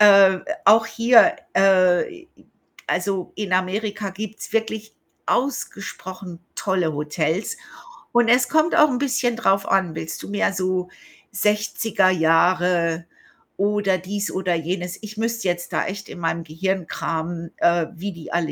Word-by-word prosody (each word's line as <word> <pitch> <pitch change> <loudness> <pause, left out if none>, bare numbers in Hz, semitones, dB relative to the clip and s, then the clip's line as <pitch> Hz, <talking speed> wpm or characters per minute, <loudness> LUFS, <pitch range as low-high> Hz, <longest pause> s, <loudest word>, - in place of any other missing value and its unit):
Äh, 195 -2 +7 0.3
auch 225 +1 +6
hier, 230 +1 +5 0.2
äh 190 - +3 0.6
also, 185 +1 -2
in 200 -3 -3
Amerika 200 +2 -1
gibt's 215 +3 -7
wirklich 220 -1 -2 0.3
ausgesprochen 190 -8 -3 0.2
tolle 180 -5 0
Hotels. 155 - -2 0.6
Und 240 -1 +3
es 245 +1 +4
kommt 315 +2 +2
auch 305 - +6
'n 250 - -1
bisschen 250 -3 0
drauf 195 -3 +2
an, 190 -4 +1
willst 160 - -5
du - - -8
mehr 205 -1 +1
so 185 -1 -1 0.4
60er 210 -2 +1
Jahre 170 0 +2 0.5
oder 200 -1 +1
dies 200 +3 -4
oder 185 -1 -1
jenes? 175 +2 -3
Ich 215 0 -9
müsste 230 -2 -2
jetzt 175 0 -2
da - - 0
echt 205 +2 -6
in - - -9
meinem 165 0 -1
Gehirn 180 +3 -2
kramen, 165 +1 -4
äh, 170 -2 +2
wie 200 +4 -5
die 170 -2 -10
alle 170 -2 0
190 Hz, 140 wpm, -22 LUFS, 175-215 Hz, 0.6 s, Äh